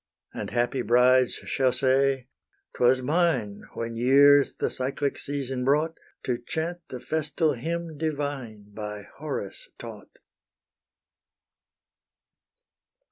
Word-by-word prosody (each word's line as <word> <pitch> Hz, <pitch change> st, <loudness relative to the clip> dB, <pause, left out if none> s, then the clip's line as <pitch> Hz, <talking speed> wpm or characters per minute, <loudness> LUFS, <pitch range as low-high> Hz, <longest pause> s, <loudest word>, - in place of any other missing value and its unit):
And -, -, -5 dB
happy 120 Hz, +2 st, 0 dB
brides 125 Hz, +2 st, +4 dB
shall 135 Hz, -4 st, 0 dB
say, 135 Hz, 0 st, +1 dB, 0.5 s
"'Twas 130 Hz, +1 st, +3 dB
mine, 135 Hz, -, 0 dB
When 115 Hz, 0 st, -4 dB
years 140 Hz, +4 st, +5 dB
the -, -, -1 dB
cyclic 140 Hz, +2 st, -1 dB
season 135 Hz, -3 st, -3 dB
brought, 150 Hz, +5 st, +2 dB, 0.3 s
To 125 Hz, -2 st, -1 dB
chant 160 Hz, +7 st, -3 dB
the 125 Hz, -, -6 dB
festal 155 Hz, +3 st, 0 dB
hymn 165 Hz, +4 st, -4 dB
divine 140 Hz, -9 st, -4 dB
By 105 Hz, -1 st, -6 dB, 0.2 s
HORACE 155 Hz, -, -5 dB
taught." -, -, -11 dB
135 Hz, 100 wpm, -26 LUFS, 125-150 Hz, 0.5 s, years